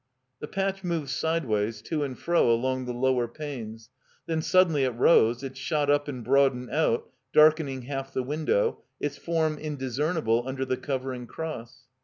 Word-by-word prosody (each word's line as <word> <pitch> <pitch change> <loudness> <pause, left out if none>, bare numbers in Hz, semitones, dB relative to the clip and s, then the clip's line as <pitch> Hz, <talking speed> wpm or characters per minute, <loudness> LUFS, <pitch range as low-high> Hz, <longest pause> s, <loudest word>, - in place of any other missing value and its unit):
The 150 - -6
patch 195 +1 -2
moved 165 -6 -2
sideways 115 -11 0
to 155 -3 -2
and 130 -3 -4
fro 170 -7 +2
along 130 +2 0
the 125 - -3
lower 125 0 +1
panes; 115 -5 -7 0.3
then 160 -1 -1
suddenly 165 -5 +3
it 130 -3 0
rose, 120 -2 +4
it 135 -1 -6
shot 145 +2 0
up 145 0 +2
and 130 -4 -5
broadened 130 0 +2
out, 150 -7 +1 0.2
darkening 150 -4 +4
half 135 +1 -5
the 130 - -1
window, 160 - 0 0.2
its - - -3
form 160 -3 0
indiscernible 145 -3 0
under 130 0 -2
the 130 -1 -1
covering 130 -3 -4
cross. 130 -6 -7
135 Hz, 160 wpm, -27 LUFS, 125-155 Hz, 0.3 s, rose